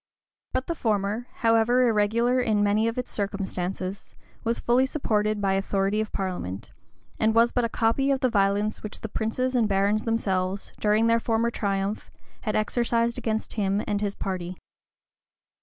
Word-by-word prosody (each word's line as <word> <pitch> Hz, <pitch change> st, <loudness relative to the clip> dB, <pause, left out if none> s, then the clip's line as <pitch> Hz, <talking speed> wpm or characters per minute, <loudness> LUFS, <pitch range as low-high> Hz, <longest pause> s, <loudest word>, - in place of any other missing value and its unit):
But 260 Hz, 0 st, 0 dB
the 335 Hz, -, -2 dB
former, 215 Hz, -3 st, -1 dB
however 230 Hz, +2 st, +3 dB
irregular 230 Hz, +3 st, +2 dB
in 215 Hz, -4 st, +2 dB
many 210 Hz, +2 st, +2 dB
of 230 Hz, -, -2 dB
its 250 Hz, -, -3 dB
circumstances, 195 Hz, -1 st, -4 dB, 0.3 s
was 230 Hz, +1 st, 0 dB
fully 250 Hz, +2 st, +3 dB
supported 215 Hz, -7 st, 0 dB
by 195 Hz, -1 st, +1 dB
authority 195 Hz, +2 st, 0 dB
of 215 Hz, -, -4 dB
parliament, 180 Hz, -, -4 dB, 0.5 s
and 220 Hz, 0 st, +2 dB
was 230 Hz, +1 st, +5 dB
but 245 Hz, -2 st, +1 dB
a -, -, -2 dB
copy 230 Hz, +5 st, +1 dB
of 270 Hz, -1 st, +1 dB
the 255 Hz, -, +4 dB
violence 205 Hz, -1 st, +1 dB
which 210 Hz, -, -6 dB
the 220 Hz, -, -5 dB
princes 240 Hz, +5 st, -1 dB
and 235 Hz, -4 st, +3 dB
barons 200 Hz, +2 st, +1 dB
themselves, 195 Hz, -4 st, -1 dB
during 215 Hz, +1 st, +3 dB
their 230 Hz, 0 st, +4 dB
former 230 Hz, 0 st, 0 dB
triumph, 200 Hz, -1 st, -2 dB, 0.3 s
had 215 Hz, -, -2 dB
exercised 235 Hz, +2 st, +1 dB
against 220 Hz, -1 st, -2 dB
him 200 Hz, -1 st, 0 dB
and 205 Hz, 0 st, -1 dB
his 200 Hz, -1 st, -2 dB
party. 185 Hz, -2 st, -4 dB
215 Hz, 160 wpm, -26 LUFS, 200-230 Hz, 0.5 s, was